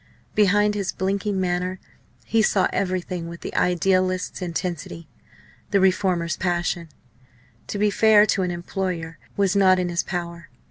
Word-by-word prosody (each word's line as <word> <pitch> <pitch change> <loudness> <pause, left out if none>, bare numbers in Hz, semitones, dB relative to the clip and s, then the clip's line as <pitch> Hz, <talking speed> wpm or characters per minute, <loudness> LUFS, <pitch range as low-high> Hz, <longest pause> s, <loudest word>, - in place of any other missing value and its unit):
Behind 210 0 +3
his 200 -2 -2
blinking 195 +1 -1
manner 180 0 -1 0.5
he 225 - +2
saw 200 -3 +3
everything 180 -2 -2
with 170 0 -9
the - - -6
idealist's 185 +1 +1
intensity, 170 -2 -4 0.6
the 200 - +3
reformer's 185 -3 +1
passion. 175 -2 -1 0.8
To - - -4
be 210 0 +2
fair 215 0 +5
to 200 - +1
an 180 - 0
employer 175 -1 -4 0.2
was 200 -1 +2
not 190 -2 +5
in 180 -1 -1
his 170 0 0
power. 170 -2 -5
185 Hz, 140 wpm, -23 LUFS, 175-195 Hz, 0.8 s, fair